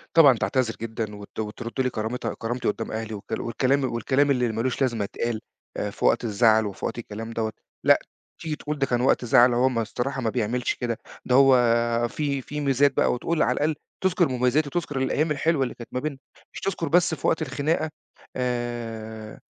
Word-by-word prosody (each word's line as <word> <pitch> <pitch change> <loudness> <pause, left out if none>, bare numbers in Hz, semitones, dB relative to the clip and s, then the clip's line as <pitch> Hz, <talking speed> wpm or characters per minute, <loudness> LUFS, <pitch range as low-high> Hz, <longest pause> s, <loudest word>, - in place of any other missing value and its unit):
طبعًا 140 -7 +7
تعتذر 125 -1 0
جدًا 110 -2 -4
وت 100 +1 -10
وترد 115 +4 -3
لي 130 - +1
كرامتها 115 +1 -3
كرامتي 120 +2 -3
قدام - - -2
أهلي 110 0 -4
والكلا 110 +2 -4
والكلام 130 +4 +1
والكلام 140 +5 +2
اللي 125 -3 +1
مالوش 115 +4 -2
لازمة 120 -5 +1
اتقال 110 +2 -3 0.4
آآ 105 - -1
في - - -4
وقت - - +3
الزعل 110 0 +4
وفي 100 -2 -5
وقت - - -3
الكلام 115 0 -6
دوّة. 110 -1 -2 0.3
لأ، - - +6 0.4
تيجي 155 -2 -2
تقول 150 0 -5
ده 135 - +3
كان 120 -2 0
وقت 125 -1 +2
زعل 120 +1 +6
هو 125 +2 +3
ما 115 -3 0
الصراحة 125 +5 -3
ما 115 - 0
بيعملش 120 +1 0
كده 120 -2 -2 0.3
ده 125 - +2
هو 135 -1 +7 0.5
فيه 140 0 -2
فيه 150 +3 -5
ميزات 140 0 +3
بقى - - +3
وتقول 155 +6 -1
على - - +2
الأقل 155 +1 +1 0.3
تذكر 180 -2 +3
مميزاتي 130 +4 +1
وتذكر 145 -3 -3
الأيام 150 +4 +1
الحلوة 150 -1 +1
اللي 130 - -4
كانت 120 - -10
ما 125 - 0
بيننا 145 -1 -3 0.4
مش - - -6
تذكر 170 -4 -2
بس 175 +2 +4
في - - -2
وقت - - +2
الخناقة 145 +4 0 0.5
آآ، 115 -3 -4
125 Hz, 195 wpm, -25 LUFS, 115-140 Hz, 0.5 s, طبعًا